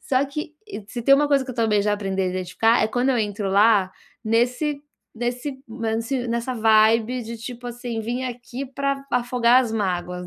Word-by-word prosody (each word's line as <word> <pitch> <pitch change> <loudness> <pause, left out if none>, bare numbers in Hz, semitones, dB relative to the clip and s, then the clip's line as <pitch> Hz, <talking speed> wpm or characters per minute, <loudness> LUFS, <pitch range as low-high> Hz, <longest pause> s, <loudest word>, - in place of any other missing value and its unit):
Só 265 +1 +1
que 300 +2 -6 0.3
se 240 +1 -5
tem 275 +3 +6
uma 295 +1 +3
coisa 275 -2 +3
que 260 - -6
eu 250 - -7
também 220 -3 +2
já 210 0 +1
aprendi 195 -2 -3
a - - 0
identificar, 185 +6 +1
é - - +3
quando 245 +3 0
eu 245 - +1
entro 205 -2 -2
lá 200 -1 +4 0.3
nesse 250 +6 0 0.3
nesse 245 +4 -3
nesse 230 +2 -2
nessa 235 +2 -2
vibe 225 +2 +3
de, 230 +1 -7
tipo 245 +1 -8
assim: 240 -1 -5
"Vim 240 +4 -3
aqui 245 +2 -6
pra 275 +1 -2
afogar 245 0 +3
as 225 -3 -4
mágoas", 180 -3 -2
235 Hz, 185 wpm, -23 LUFS, 220-255 Hz, 0.3 s, tem